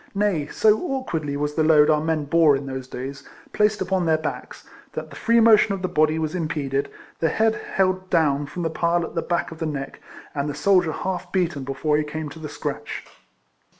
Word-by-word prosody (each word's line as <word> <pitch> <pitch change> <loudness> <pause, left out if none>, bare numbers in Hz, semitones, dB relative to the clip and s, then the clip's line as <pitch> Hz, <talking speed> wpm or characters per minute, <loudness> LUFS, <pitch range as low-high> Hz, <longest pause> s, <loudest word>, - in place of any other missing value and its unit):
Nay, 195 -8 +1
so 215 +6 +3
awkwardly 165 - -3
was 150 0 -2
the 155 - +1
load 155 -1 +5
our 150 -1 +2
men 160 -2 -1
bore 160 -1 +4
in 135 +1 -4
those 130 -1 -5
days, 135 +2 -6 0.3
placed 210 -1 +2
upon 190 -1 0
their 160 -1 +4
backs, 155 - -6 0.3
that - - -6
the - - -10
free 235 0 +3
motion 220 -2 +6
of 190 - -8
the - - +1
body 155 -1 +2
was 155 0 -2
impeded, 150 -5 -2 0.3
the 165 - +2
head 220 +5 +2 0.2
held 185 -1 +1
do 175 - +3
svn 145 -3 +1
from 175 +4 -5
the 165 - -1
pile 170 +1 +1
at - - -9
the 165 - -1
back 170 -1 -1
of 160 - -10
the 160 - -1
neck, 140 -3 -5 0.3
and 140 0 -2
the 145 - -4
soldier 180 0 +3
half 180 +3 -4
beaten 170 -7 0
before 140 +3 0
he 150 - +1
came 150 0 -5
to 160 - -11
the 155 -1 -6
scratch. 150 - -5
160 Hz, 215 wpm, -23 LUFS, 150-185 Hz, 0.3 s, motion